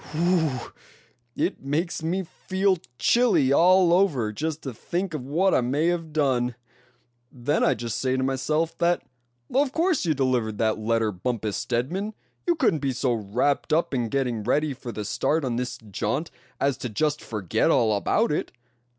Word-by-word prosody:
Whew! 160 -6 0 0.6
it - - -1
makes 155 +6 -2
me 180 +4 -1
feel 190 +2 0 0.2
chilly 225 - +3
all 180 +2 +5
over 145 - +2
just 155 +5 -3
to 135 - -5
think 175 - -3
of 135 -4 -5
what 180 +7 +2
I - - +4
may 145 +7 +1
have 165 -2 -2
done. 130 -5 +1 0.8
Then 135 +5 0
I 135 - +3
just 115 0 -4
say 130 0 +1
to 130 - 0
myself 150 +5 0
that 175 +1 +2 0.5
of 270 +1 +2
course 330 +1 +1
you 160 -4 +1
delivered 125 -6 0
that 110 0 +1
letter 110 0 +1
Bumpus 105 +2 -3
Stedman; 180 - -2 0.3
you 345 - +3
couldn't 245 - +2
be 135 -2 -1
so 125 0 0
wrapped 115 +8 0
up 160 -1 +2
in 120 -3 0
getting 125 -3 -1
ready 150 +7 +1
for 125 -2 -7
the 105 -2 -5
start 155 +8 0
on 120 -2 -1
this 125 0 -3
jaunt 110 - -3 0.3
as 140 -2 +1
to 125 - -4
just 150 +7 0
forget 105 -6 0
all 110 -2 +3
about 215 - +1
it. 150 - -2
140 Hz, 170 wpm, -25 LUFS, 120-170 Hz, 0.8 s, all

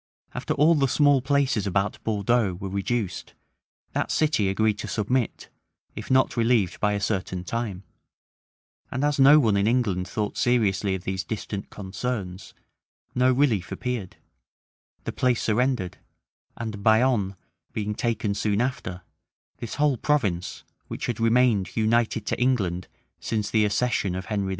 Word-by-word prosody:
After - - -2
all 155 +4 +5
the 140 -4 +2
small 145 0 +4
places 135 -6 +1
about 100 +1 -1
Bordeaux 105 -2 +1
were 95 +2 -6
reduced, 100 +1 -3 0.6
that - - -1
city 150 -11 +2
agreed 105 +1 +1
to - - -5
submit, 115 +3 -1 0.5
if - - -7
not 130 0 +3
relieved 115 -6 +2
by 105 -1 +1
a 100 - -1
certain 95 -3 -2
time; 100 -1 -4 1.1
and 130 - -2
as 145 -1 +1
no 140 +3 +8
one 110 -7 +3
in 100 +1 +2
England 105 -7 +1
thought 105 +2 -3
Seriously 105 -6 +1
of 90 - -7
these 95 -1 -2
distant 100 -1 -5
concerns, 100 -1 -5 0.6
no 125 +1 +3
relief 125 -8 +1
appeared; 120 -7 -4 0.9
the - - -3
place 125 -2 +1
surrendered; 115 -4 0 0.6
and 110 -3 -5
Bayonne 110 -3 +3 0.4
being 105 -1 -2
taken 110 -2 -1
soon 105 0 0
after, 105 -8 -3 0.5
this 115 - -6
whole 145 -3 +2
province, 105 -12 -1 0.2
which - - -5
had 120 -2 -3
remained 115 -4 +2
united 110 0 +1
to - - -2
England 95 -9 0 0.3
since 105 -2 -2
the 110 -2 +3
accession 105 -3 0
of 95 0 -5
Henry 100 -2 -2
II. - - -3
110 Hz, 145 wpm, -25 LUFS, 100-125 Hz, 1.1 s, no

